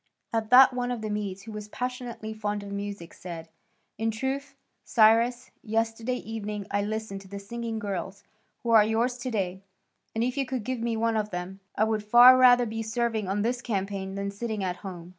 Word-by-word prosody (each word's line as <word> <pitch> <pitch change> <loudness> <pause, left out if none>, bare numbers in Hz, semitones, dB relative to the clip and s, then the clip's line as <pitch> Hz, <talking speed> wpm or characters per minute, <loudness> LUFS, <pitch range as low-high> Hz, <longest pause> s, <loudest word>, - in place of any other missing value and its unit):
At 225 -1 -1
that 255 +1 +8
one 245 0 -2
of 245 -3 -3
the 215 -1 -3
Medes 200 -2 -3
who 220 - -9
was 210 -1 -7
passionately 245 -2 -5
fond 210 -1 -3
of 200 - -8
music 200 -4 -5
said, 165 -2 -8 0.5
"In 225 0 +1
truth, 270 +4 -3 0.3
Cyrus, 235 +3 +3
yesterday 225 +2 -1
evening 210 -3 -5
I 205 - +1
listened 210 -1 -4
to 195 - -14
the 200 +1 -7
singing 230 +3 -5
girls 200 -1 -4 0.4
who 235 - 0
are 220 -2 +8
yours 235 +3 0
to 255 - -3
day, 190 -4 -2 0.5
and 225 - +1
if 250 +2 -1
you 275 - +1
could 255 -4 -3
give 255 +2 -3
me 230 -1 -1
one 225 0 +1
of 210 -1 -1
them, 180 +1 -5 0.2
I 215 - +2
would 220 -1 0
far 240 +4 +9
rather 245 -1 +6
be 225 0 -4
serving 225 -2 -1
on 200 +2 0
this 240 +1 -1
campaign 195 -3 -3
than 200 0 -3
sitting 215 0 -3
at 180 -1 -2
home." 180 -3 -8
220 Hz, 200 wpm, -27 LUFS, 200-240 Hz, 0.5 s, far